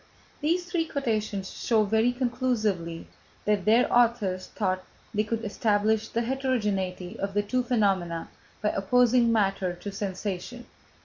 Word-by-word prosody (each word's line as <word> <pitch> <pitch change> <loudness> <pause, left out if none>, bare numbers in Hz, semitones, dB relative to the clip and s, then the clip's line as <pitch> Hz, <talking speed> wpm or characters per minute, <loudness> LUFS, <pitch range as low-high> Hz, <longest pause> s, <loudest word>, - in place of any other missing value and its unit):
These 340 +4 +1
three 345 -2 -1
quotations 215 -9 -2
show 225 -3 +3
very 220 +3 +2
conclusively 230 -9 -1 0.4
that 210 -3 +1
their 230 +3 +5
authors 225 -6 +2
thought 185 -3 -1 0.3
they 210 0 +2
could 225 +1 -3
establish 215 +1 +1
the 235 - -1
heterogeneity 210 -7 -1
of 200 0 -3
the 205 - +2
two 255 +5 0
phenomena 195 -9 0 0.4
by 210 - +3
opposing 240 +4 +3
matter 195 -4 +1
to 200 +3 -7
sensation. 200 +4 -4
215 Hz, 130 wpm, -27 LUFS, 195-245 Hz, 0.4 s, their